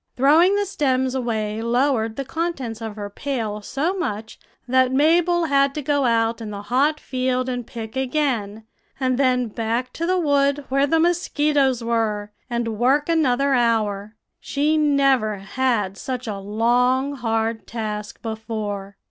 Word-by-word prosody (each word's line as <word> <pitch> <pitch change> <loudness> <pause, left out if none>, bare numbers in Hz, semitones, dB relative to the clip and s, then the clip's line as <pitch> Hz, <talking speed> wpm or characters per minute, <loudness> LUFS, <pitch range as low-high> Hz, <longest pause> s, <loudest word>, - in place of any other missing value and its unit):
"Throwing 320 +9 +5
the 410 0 +1
stems 260 -8 0
away 220 -4 -2
lowered 235 -1 +1
the 275 - -4
contents 270 -9 -3
of 220 -2 -5
her 205 -1 -5
pail 220 -2 -4
so 280 - -1
much 220 - -4 0.3
that 260 0 +3
Mabel 335 +5 +3
had 275 -2 +2
to 300 - -3
go 285 -1 +1
out 230 -1 +1
in 220 - -5
the 205 -1 -6
hot 280 +8 +1
field 255 0 -1
and 245 -2 -3
pick 225 0 -7
again, 250 -6 -1 0.4
and 255 -1 0
then 250 -2 +2
back 230 +3 -2
to 335 - -3
the 370 +1 +2
wood 285 -3 +1
where 275 +2 +2
the 325 +3 +2
mosquitoes 295 -7 +1
were, 220 -3 -1 0.2
and 235 -3 -2
work 280 +5 +2
another 280 -4 +2
hour. 215 -4 0 0.2
She 295 +2 0
never 275 -7 +3
had 205 -1 -1
such 255 -1 -4
a 205 -3 -4
long, 245 +6 +1
hard 225 -3 -2
task 210 -2 -5
before. 215 -3 -5
250 Hz, 150 wpm, -22 LUFS, 220-280 Hz, 0.4 s, Throwing